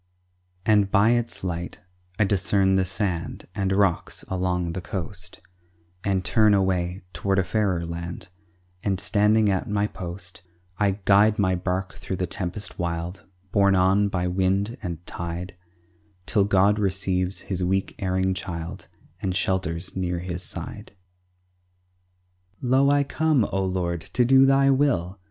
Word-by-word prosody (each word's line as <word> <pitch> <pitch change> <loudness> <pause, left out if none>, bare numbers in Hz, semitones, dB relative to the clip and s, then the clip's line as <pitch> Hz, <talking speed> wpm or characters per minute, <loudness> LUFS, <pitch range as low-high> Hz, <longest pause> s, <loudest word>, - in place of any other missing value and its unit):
And 105 -2 +4
by 105 +3 +4
its 120 -4 -1
light 85 -1 -4 0.4
I 105 - +4
discern 95 -1 +2
the 95 0 +3
sand 90 -2 -3
And 100 -2 -1
rocks 95 -3 0
along 90 -2 -1
the 95 - -4
coast, 95 -1 -5 0.6
And 95 -2 0
turn 105 +2 +4
away 95 -1 0
toward 95 +5 0
a 95 - +3
fairer 90 -2 0
land, 85 +2 -6 0.5
And 95 -3 0
standing 105 +2 +3
at 95 +4 -1
my 105 0 +1
post, 90 -3 -7 0.4
I 100 -2 +2
guide 105 +2 +5
my 95 -2 +2
bark 90 0 -2
thro' 95 - -5
the 90 - -1
tempest 90 +4 -4
wild, 85 +1 -3 0.3
Borne 100 -1 +4
on 95 +2 +3
by 90 -2 -1
wind 95 +5 0
and 85 -3 -6
tide, 85 +2 -5 0.7
Till 100 -4 +2
God 100 +1 +3
receives 95 -1 0
His 95 -2 -3
weak, 95 +2 0
erring 95 0 +1
child, 90 -1 -6 0.3
And 95 -2 -1
shelters 90 -2 -1
near 90 -2 -1
His 90 0 -4
side. - - -7 1.7
"Lo, 130 +2 +3
I 145 0 +4
come, 150 -4 +2
O 95 0 0
Lord, 90 -2 -1
to 120 +7 +1
do 135 +2 +6
Thy 135 0 +5
will!" 100 - +1
95 Hz, 140 wpm, -25 LUFS, 90-105 Hz, 1.7 s, do